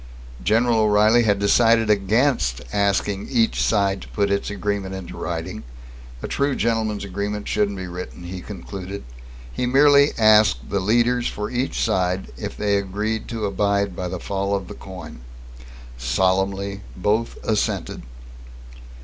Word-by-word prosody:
General 115 +2 +3
O'Reilly 110 +2 +4
had 100 -2 +3
decided 115 +2 +4
against 100 - +1
asking 100 0 0
each 115 -3 +2
side 100 -3 +1
to - - -10
put 100 -1 -1
its 100 - 0
agreement 100 -2 -3
into 95 -2 -8
writing. - - -4 0.6
A - - -2
true 140 -1 0
gentleman's 110 -3 0
agreement 100 +2 -4
shouldn't 100 -1 0
be 95 - -5
written, 90 0 -8
he 90 +1 -6
concluded. 100 -1 -7 0.5
He 125 - -1
merely 140 +2 +5
asked 105 - +4
the 100 - +1
leaders 120 +5 +2
for 105 0 -4
each 125 +2 -2
side 90 +1 0
if - - -6
they 100 -1 +1
agreed 105 +3 -2
to 115 -3 -3
abide 100 -1 0
by 90 - -3
the 90 0 -5
fall 100 +2 -1
of 95 -2 -4
the - - -6
coin. 95 -8 -10 0.8
Solemnly, 95 +8 0 0.2
both 105 +5 0
assented. 110 -2 -1
100 Hz, 140 wpm, -22 LUFS, 95-110 Hz, 0.8 s, merely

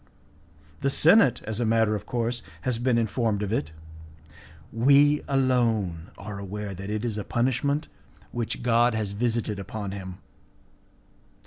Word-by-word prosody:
The 140 - +1
senate, 160 - +5
as 110 0 -4
a - - +1
matter 110 -1 +2
of 105 0 -4
course, 120 0 -1 0.2
has 120 +3 -1
been 120 -1 +2
informed 110 -2 0
of 105 +1 -2
it. 80 -9 -1 1.0
We 140 +5 +5
alone 115 - +1
are 100 0 -7
aware 100 +1 -5
that 100 +2 -7
it 105 +2 -2
is 110 -3 -2
a - - -3
punishment 130 +6 0 0.4
which 120 0 -3
God 120 0 +3
has 105 -3 -2
visited 110 -1 -1
upon 100 0 -5
him. 95 -2 -7
115 Hz, 140 wpm, -26 LUFS, 105-125 Hz, 1.0 s, senate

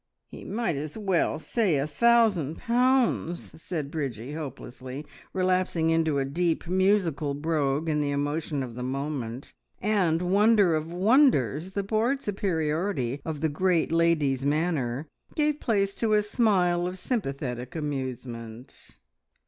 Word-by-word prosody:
"Ye - - -10
might 215 -7 -1
as 150 +5 -5
well 190 -7 +1
say 180 0 0
a 135 - 0
thousand 200 - +3
pounds!" 245 -10 +1
said 155 -6 -4
Bridgie 135 -5 -4
hopelessly, 130 -2 -7 0.3
relapsing 185 -3 +1
into 160 -3 +2
a 135 - +1
deep, 165 +5 -1
musical 180 -6 +1
brogue 150 0 0
in 150 -1 +1
the 145 - 0
emotion 145 0 -1
of 120 -2 -7
the 125 - -7
moment, 130 -2 -4 0.3
and, 180 -5 +1
wonder 200 0 +4
of 155 +1 -2
wonders, 185 - +3
the 200 0 -1
bored 230 +7 0
superiority 160 - -1
of 155 -3 -5
the 160 - +2
great 170 +2 +1
lady's 160 -6 +2
manner 145 -3 0 0.3
gave 300 -1 +1
place 200 -4 +1
to 220 0 0
a 210 0 +4
smile 185 -6 +2
of 180 +1 -5
sympathetic 135 - -3
amusement. 125 -5 -6
160 Hz, 130 wpm, -27 LUFS, 140-195 Hz, 0.3 s, wonder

